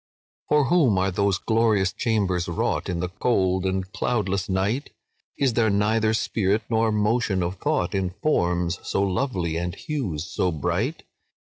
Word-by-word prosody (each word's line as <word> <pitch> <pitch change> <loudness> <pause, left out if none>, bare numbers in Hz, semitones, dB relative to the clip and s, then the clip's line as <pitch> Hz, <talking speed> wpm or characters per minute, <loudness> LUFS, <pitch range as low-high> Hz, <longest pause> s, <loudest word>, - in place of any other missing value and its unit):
"For 150 -1 +4
whom 135 - +3
are 95 +1 +1
those 100 0 +1
glorious 110 -4 +2
chambers 95 -7 0
wrought, 85 - -1
In 85 -1 -2
the 90 - -2
cold 95 -3 +1
and 95 0 -1
cloudless 100 -4 -1
night? 100 +9 0 0.5
Is 135 -4 +2
there 110 -1 +2
neither 110 +2 +2
spirit 105 -1 0
nor 110 0 +2
motion 105 -2 +1
of 90 +3 -3
thought 90 0 0
In 95 -2 0
forms 90 - +1
so 100 - -1
lovely 90 - -1
and 85 +1 -3
hues 120 - -3
so 90 0 -1
bright? 75 -4 -2
100 Hz, 150 wpm, -24 LUFS, 90-115 Hz, 0.5 s, For